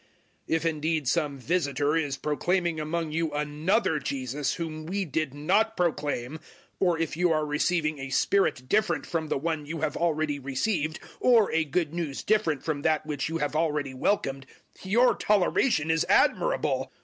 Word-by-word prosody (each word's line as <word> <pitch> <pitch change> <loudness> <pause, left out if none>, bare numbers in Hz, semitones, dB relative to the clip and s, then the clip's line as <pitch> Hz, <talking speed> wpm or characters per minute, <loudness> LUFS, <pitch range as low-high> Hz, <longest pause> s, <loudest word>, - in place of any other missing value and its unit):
011:004 - - -34 0.5
If 165 0 -1
indeed 155 -2 0
some 150 -2 0
visitor 145 0 0
is 145 -4 -1
proclaiming 170 +2 0
among 160 +1 -2
you 160 0 -1
another 150 +5 0
Jesus 135 0 -2
whom 155 -2 -5
we 195 +2 -1
did 155 -2 -2
not 200 +10 +1
proclaim, 150 -5 -1 0.4
or 175 -3 +2
if 165 -1 -2
you 175 +1 +2
are 155 -1 +1
receiving 155 0 0
a 135 0 -5
Spirit 135 -4 +1
different 215 +8 +1
from 165 -2 -2
the - - 0
One 155 0 -3
you 160 0 -5
have 155 -2 -1
already 155 -3 0
received 155 +4 -1 0.2
or 235 -4 +4
a 160 - +2
Good 155 +1 -1
News 165 -5 -3
different 205 -9 +1
from 150 -3 -2
that 155 0 +1
which 150 -2 -3
you 165 - -2
have 145 -1 -2
already 150 -4 0
welcomed, 135 -3 -1 0.3
your 230 +7 +4
toleration 195 - +2
is 160 0 +2
admirable! - - +2
155 Hz, 165 wpm, -27 LUFS, 145-175 Hz, 0.5 s, or